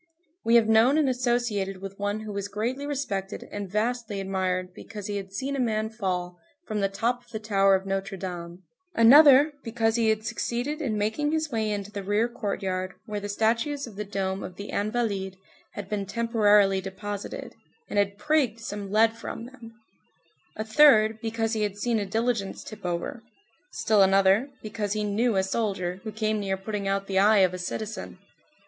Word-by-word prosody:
We 230 - +4
have 230 -2 +6
known 225 +6 +5
and 305 -3 +3
associated 240 -6 0
with 195 +1 -9
one 205 +1 -1
who 215 -1 -6
was 200 0 -3
greatly 240 +8 -3
respected 210 -9 -3
and 205 -2 -5
vastly 220 0 -1
admired 185 -1 -2
because 210 +1 -9
he 205 0 -2
had 195 -1 -7
seen 270 +7 -3
a - - -2
man 220 -3 0
fall 180 -5 -3 0.3
from 215 -2 -3
the 195 -1 +1
top 240 +5 -1
of - - -26
the 220 - -4
tower 195 -2 +3
of 190 0 -2
Notre 195 0 -3
Dame; 175 -1 -7 0.3
another, 285 +5 +8
because 225 0 0
he 225 -1 +3
had 220 0 0
succeeded 255 +8 -2
in 230 -8 -1
making 220 +9 0
his 315 -1 -1
way 220 -2 0
into 205 -1 -3
the 205 -1 -5
rear 205 +4 +1
courtyard 195 -5 -3
where 210 -3 -4
the 205 0 -6
statues 230 +7 0
of 225 -5 -11
the 210 - -3
dome 195 -1 -3
of 180 - -7
the 200 +2 -7
Invalides 200 -3 -1 0.4
had 205 -2 -6
been 200 -1 -3
temporarily 210 -3 +3
deposited, 195 +1 -6 0.3
and 205 - 0
had 200 0 0
"prigged" 285 -5 +1
some 205 -3 -6
lead 225 +2 +4
from 230 0 -7
them; 235 -3 -13 0.8
a 215 - -3
third, 220 -3 +5
because 225 0 -1
he 220 - -1
had 205 -1 -1
seen 230 +1 0
a 200 - -3
diligence 225 -1 -1
tip 210 -4 -7
over; 175 +6 -3 0.5
still 215 -2 +2
another, 195 +6 +4
because 210 -2 -3
he 215 0 -1
"knew" 215 +2 +1
a 190 - +3
soldier 190 -3 -2
who 215 - -5
came 215 0 -1
near 195 -1 -1
putting 200 +1 -4
out 195 0 0
the 190 -1 +1
eye 210 +2 +5
of 185 - -2
a 185 - -5
citizen. 215 +3 -5
210 Hz, 190 wpm, -26 LUFS, 195-230 Hz, 0.8 s, another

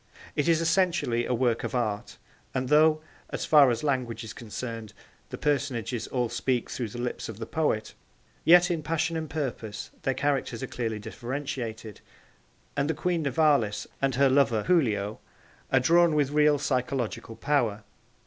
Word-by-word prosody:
It 145 - 0
is 165 -1 +3
essentially 165 -9 +1
a - - 0
work 120 -1 +1
of - - -3
art, 105 -4 -2 0.4
and 130 -1 -1
though, 155 +1 +5 0.3
as - - -3
far 145 -4 +7
as 120 +1 -1
language 130 -5 -1
is 110 - -7
concerned, 115 -1 -7 0.4
the - - -6
personages 125 -6 -1
all 125 -2 0
speak 125 +1 -1
through 120 - -3
the 110 - -9
lips 120 -1 -4
of 110 - -7
the 115 - -5
poet, 130 -7 -1 0.5
yet 175 +2 +6
in 165 -2 -1
passion 165 +1 -1
and 160 -2 -3
purpose 120 -8 -4
their 135 - 0
characters 135 -3 -1
are - - 0
clearly 115 -4 -3
differentiated, 115 -2 -5 0.7
and 145 +1 0
the 160 - 0
Queen 175 +2 0
Nivalis 140 -7 +2 0.2
and 135 -1 +1
her 140 +1 +4
lover 130 -5 +3
Giulio 110 - +1 0.5
are 130 - +5
drawn 170 +4 +4
with 145 -2 +2
real 150 0 +4
psychological 125 -4 -2
power. 120 -8 0
130 Hz, 160 wpm, -27 LUFS, 115-150 Hz, 0.7 s, far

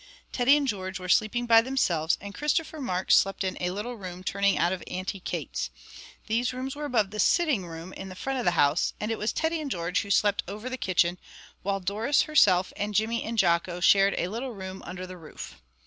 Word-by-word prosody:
Teddy 265 +4 +4
and 285 -2 -1
George 190 -4 -3
were 180 - -7
sleeping 215 +6 +2
by 230 -1 +7
themselves, 180 -11 +1
and 200 0 -8
Christopher 305 +2 -1
Mark 185 -7 -2
slept 195 +1 +4
in 190 -1 -2
a 180 - 0
little 210 +7 -4
room 185 -2 -8
turning 200 -1 +1
out 170 +4 +2
of 185 - -5
Auntie 185 +2 -4
Kate's. - - -4 0.6
These 235 +2 0
rooms 260 +2 -4
were 295 0 -5
above 220 -8 +1
the 210 - -6
sitting 280 - +2
room 165 +2 -8
in 190 - -8
the 185 - -9
front 265 +7 -3
of 245 - -3
the - - +2
house, 145 +3 +3
and 210 +2 -2
it 225 - -2
was 215 - 0
Teddy 320 0 -1
and 295 - -4
George 175 -5 -1
who 200 - -8
slept 205 0 +3
over 210 +7 -6
the - - -1
kitchen; 180 -4 +1 0.4
while 195 0 -1
Doris 210 +9 +1
herself 190 -12 +4
and 205 0 -3
Jimmy 225 +3 +1
and 230 +1 -4
Jocko 175 -1 +2
shared 195 +2 +5
a 175 - -1
little 240 +4 -4
room 190 -2 -7
under 185 +1 -6
the 185 0 -9
roof. 155 - -10
200 Hz, 220 wpm, -27 LUFS, 185-240 Hz, 0.6 s, by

